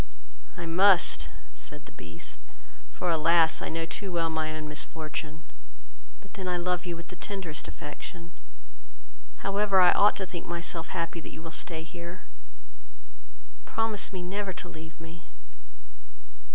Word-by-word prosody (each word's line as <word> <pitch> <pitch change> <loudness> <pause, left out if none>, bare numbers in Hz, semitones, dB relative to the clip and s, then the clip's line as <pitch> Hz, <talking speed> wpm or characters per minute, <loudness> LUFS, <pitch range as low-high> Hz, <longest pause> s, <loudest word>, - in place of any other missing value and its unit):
"I 170 - -3
must, 185 +3 +6 0.2
said - - -7
the - - -12
Beast, 80 0 -9 0.5
for, 180 - 0
alas! 165 0 +5
I - - -2
know 165 0 -1
too 195 +3 -3
well 165 -2 +1
my 160 -1 0
own 155 0 -4
misfortune; 155 0 -4 0.8
but 195 - -17
then 190 -3 -4
I 180 -1 +2
love 180 0 0
you 175 - -1
with 170 0 -9
the 185 - -7
tenderest 185 -6 -3
affection: 170 +3 -7 1.1
however, 200 0 +4
I 180 -1 +9
ought 205 +1 +6
to 195 - -2
think 175 -2 -6
myself 170 -1 -2
happy 170 -1 -2
that - - -8
you 160 - -9
will 165 - -6
stay 160 -1 -3
here; 170 +1 -8 1.4
promise 225 -2 +1
me 185 -2 -4
never 195 +1 -2
to 180 - -6
leave 160 -1 -9
me." 165 +1 -10
170 Hz, 150 wpm, -30 LUFS, 160-185 Hz, 1.4 s, I